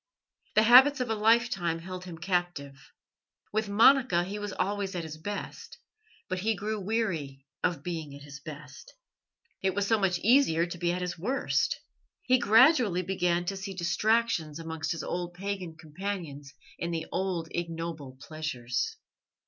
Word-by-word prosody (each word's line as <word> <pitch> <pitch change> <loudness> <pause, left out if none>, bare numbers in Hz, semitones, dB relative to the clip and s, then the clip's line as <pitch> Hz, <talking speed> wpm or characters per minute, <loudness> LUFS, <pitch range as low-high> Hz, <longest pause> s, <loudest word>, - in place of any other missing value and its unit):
The 215 - +6
habits 260 +5 +8
of 250 -3 -1
a - - +1
lifetime 215 -6 +2
held 185 +2 -8
him 175 -3 -8
captive. 160 -6 -3 0.6
With 215 -1 0
Monica 225 -3 +5
he 200 +3 -5
was 205 -1 -4
always 195 0 -2
at 175 - -2
his 155 -1 -8
best, 205 +5 -6 0.5
but 185 0 -2
he 220 +4 +1
grew 215 +1 -3
weary 165 -11 -2 0.2
of 165 -5 0
being 160 -5 -5
at 140 - -12
his 140 -1 -10
best. 155 - -11 0.7
It 190 -1 0
was 205 -1 +1
so 225 +1 +2
much 190 -3 +1
easier 215 - +4
to 175 0 -7
be 175 0 +1
at 180 +1 -2
his 175 -1 -4
worst. 255 +10 0 0.4
He 255 0 +3
gradually 225 - +5
began 175 -1 0
to 195 - -2
seek 195 -1 -6
distractions 175 -3 +1
amongst 160 -1 -4
his 165 -2 -3
old 175 0 -4
pagan 185 -3 -4
companions 160 -4 -6 0.3
in 170 - -2
the 165 -1 -3
old 180 -3 -2
ignoble 165 -5 -5
pleasures. 135 -6 -3
180 Hz, 155 wpm, -29 LUFS, 160-205 Hz, 0.7 s, habits